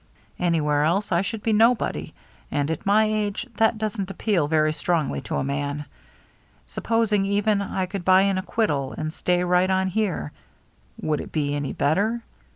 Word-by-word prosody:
Anywhere 150 -4 +1
else 185 +7 0
I 170 0 +3
should 210 +2 -4
be 225 - +1
nobody, 230 +3 +2 0.4
and 145 +2 -1
at 160 - -4
my 210 +2 +5
age 215 +1 -1
that 225 0 +3
doesn't 210 -3 -3
appeal 195 -5 0
very 155 0 +2
strongly 160 -1 -1
to - - -4
a - - 0
man. 145 +1 -3 0.8
Supposing, 225 -3 0
even, 200 +1 +1
I 190 -1 -2
could 185 0 -5
buy 185 +1 +5
an 195 -1 +1
acquittal 150 - -1
and 155 0 -3
stay 180 0 0
right 180 +1 +2
on 190 0 +1
here, 185 - -1 0.7
would 155 -1 -1
it - - -9
be 145 -2 -1
any 145 -2 -2
better? 210 +10 +1
185 Hz, 165 wpm, -24 LUFS, 155-210 Hz, 0.8 s, my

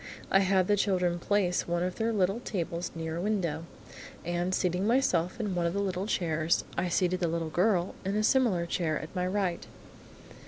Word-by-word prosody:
I 195 - +6
had 190 -1 +3
the 205 - +4
children 180 -3 +1
place 185 -1 +1
one 175 0 0
of 180 0 -3
their 225 0 0
little 195 0 +1
tables 175 -6 -3
near 160 0 -4
a - - -2
window, 175 -6 -1 0.6
and 175 +1 -1
seating 180 +1 0
myself 225 -7 +2
in 210 -4 -1
one 175 -1 +1
of 170 - -2
the 200 - -1
little 190 0 -2
chairs, 165 -4 +1
I 180 - 0
seated 180 +1 +1
the 175 - +1
little 165 -1 -2
girl 180 0 +2
in 195 +2 -1
a 215 - +1
similar 215 -9 +3
chair 170 -3 -1
at 155 - -9
my 180 0 0
right. 185 -2 -1
180 Hz, 195 wpm, -29 LUFS, 170-200 Hz, 0.6 s, I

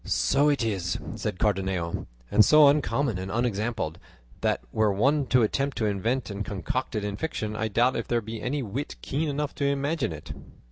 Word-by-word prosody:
"So 145 +2 +2
it 140 -4 +1
is," 95 -6 -1 0.2
said - - -3
Cardenio; 95 -4 -1 0.2
"and 105 - +7
so 150 +3 +7
uncommon 140 -6 +2
and 95 +1 -5
unexampled, 110 -6 -1 0.4
that - - +1
were 110 -1 +2
one 135 +8 +2
to 125 -2 +4
attempt 135 +5 0
to 110 - 0
invent 110 +4 -1
and 100 +1 -3
concoct 105 +6 -3
it 105 -1 -1
in 100 -1 -3
fiction, 110 -8 -3
I 110 +1 -1
doubt 120 +5 +2
if 115 - -3
there 120 - +1
be 110 0 -7
any 140 +2 -1
wit 125 +7 -4
keen 150 +3 -1
enough 145 +1 -2
to 140 - -1
imagine 140 - 0
it." 75 -2 -7
115 Hz, 190 wpm, -27 LUFS, 100-140 Hz, 0.4 s, and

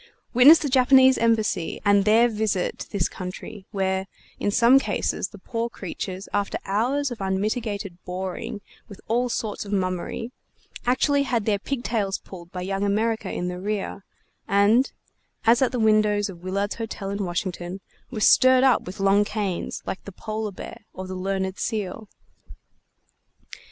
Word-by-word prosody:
Witness 265 +7 +9
the 300 - -2
Japanese 260 0 +5
Embassy 220 -7 +1
and 200 -1 +4
their 225 +3 +5
visit 215 -5 -1
to - - -7
this 195 -4 0
country, 190 +2 -8
where, 190 -1 -1 0.3
in - - 0
some 235 +6 +6
cases, - - -1
the - - -13
poor 235 -1 -3
creatures, 190 -2 -6
after 205 -1 0
hours 250 +8 0
of 235 - -6
unmitigated 200 -1 -2
boring 185 +2 -5 0.3
with 200 - -11
all 245 +2 +1
sorts 220 -3 -3
of 205 - -9
mummery, 185 +4 -2 0.6
actually 280 +3 +3
had 240 -6 0
their 205 -2 +1
pigtails 225 -5 -2
pulled 175 -2 -12
by 180 - -5
Young 195 +1 -2
America 220 +3 0
in 180 - -3
the 180 0 -4
rear, 200 0 -3 0.4
and 205 +6 +4 0.5
as 235 +3 +5
at 260 - +3
the 250 - -2
windows 215 -2 +3
of 175 -3 -10
Willard's 200 +3 -2
Hotel 205 -3 -4
in 200 0 -2
Washington 175 0 -3 0.3
were 220 -4 -5
stirred 255 +4 +6
up 260 -3 +5
with 190 +3 -7
long 195 +1 +4
canes, 205 -4 -3
like - - -5
the 200 - -7
Polar 215 +2 -4
Bear 185 - -9
or 185 - -6
the 185 - -6
Learned 190 0 -2
Seal. 210 0 -3
205 Hz, 155 wpm, -24 LUFS, 190-230 Hz, 0.6 s, Witness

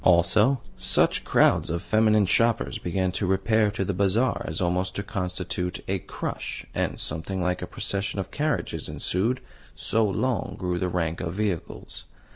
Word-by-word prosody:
Also, 95 +9 +5 0.2
such 90 - +2
crowds - - +4
of 85 +1 -2
feminine 110 -1 +4
shoppers 115 +4 +2
began 95 +1 0
to 95 +1 -1
repair 105 +3 +3
to 100 -1 -2
the 100 - -1
Bazaar 100 +7 +2
as 80 - -3
almost 90 +1 0
to 100 - -2
constitute 90 -3 -3
a 95 0 0
crush, - - -5
and - - -1
something 80 +5 -3
like 90 0 0
a - - -4
procession 100 0 -2
of 95 0 -4
carriages 150 +1 -1
ensued, 110 +8 0 0.3
so 115 +2 +1
long 110 +2 0
grew 90 -1 -1
the 90 - 0
rank 85 -2 -1
of 85 +1 -3
vehicles. 100 -5 -3
95 Hz, 160 wpm, -26 LUFS, 90-105 Hz, 0.3 s, Also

